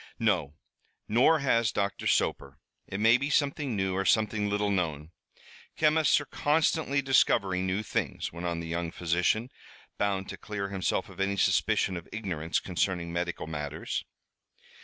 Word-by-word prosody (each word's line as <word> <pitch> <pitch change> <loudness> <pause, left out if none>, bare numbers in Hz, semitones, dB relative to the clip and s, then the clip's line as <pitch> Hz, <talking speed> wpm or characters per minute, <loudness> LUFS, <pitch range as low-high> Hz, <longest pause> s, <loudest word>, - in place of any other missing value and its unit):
"No, 90 - 0 0.5
nor 125 +9 +4
has 115 -5 +2
Doctor 100 -1 -2
Soper. - - 0 0.3
It 95 - -5
may 115 +3 +6
be 140 +3 -2
something 145 -3 0
new, 95 -1 0
or 95 - 0
something 105 0 +2
little 105 0 0
known. 80 -5 -2 0.7
Chemists 155 0 +4
are 145 - -7
constantly 145 -1 +1
discovering 95 -8 +2
new 95 +3 -1
things," - - -3
went 85 +1 -4
on 85 -1 -2
the 85 - -6
young 85 0 -2
physician, 90 +8 0 0.5
bound 100 -2 0
to - - -6
clear 100 -2 -5
himself 95 -2 -1
of - - -14
any 100 +1 0
suspicion 95 -1 +2
of 85 - -10
ignorance 90 -7 -2
concerning 90 -2 -2
medical 85 0 -3
matters. 75 -1 -4
100 Hz, 150 wpm, -29 LUFS, 85-115 Hz, 0.7 s, may